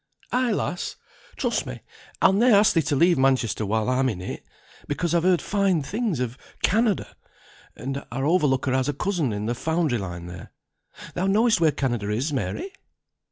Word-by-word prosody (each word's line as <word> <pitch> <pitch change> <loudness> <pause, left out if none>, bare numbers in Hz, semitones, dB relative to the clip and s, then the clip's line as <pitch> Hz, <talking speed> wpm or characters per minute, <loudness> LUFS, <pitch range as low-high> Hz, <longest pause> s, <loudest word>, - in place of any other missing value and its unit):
"Ay, 250 -1 +1
lass! 180 -3 -2 0.4
Trust - - -1
me, - - -7 0.4
I'll - - +6
ne'er 230 +3 +5
ask 205 +1 +5
thee 165 - +3
to 150 - -1
leave 170 +1 +4
Manchester 130 -5 +1
while 110 +2 0
I'm 130 +1 +2
in 100 -7 -4
it. 90 - -6 0.4
Because 165 +3 -1
I've 170 - +3
heard 180 0 +2
fine 195 -6 +1
things 210 - -2
of 125 0 -3 0.2
Canada; 215 0 +1 0.6
and 135 +2 -5
our 135 +3 -2
overlooker 145 -6 +2
has 130 +2 +1
a - - 0
cousin 165 - -1
in 105 0 -3
the 120 - 0
foundry 160 -2 0
line 90 -3 -6
there. 90 0 -10 0.6
Thou 185 +2 -1
knowest 215 0 +3
where 160 -2 +5
Canada 120 -7 -2
is, 125 +9 -1
Mary?" 360 - -3
145 Hz, 175 wpm, -24 LUFS, 125-185 Hz, 0.6 s, I'll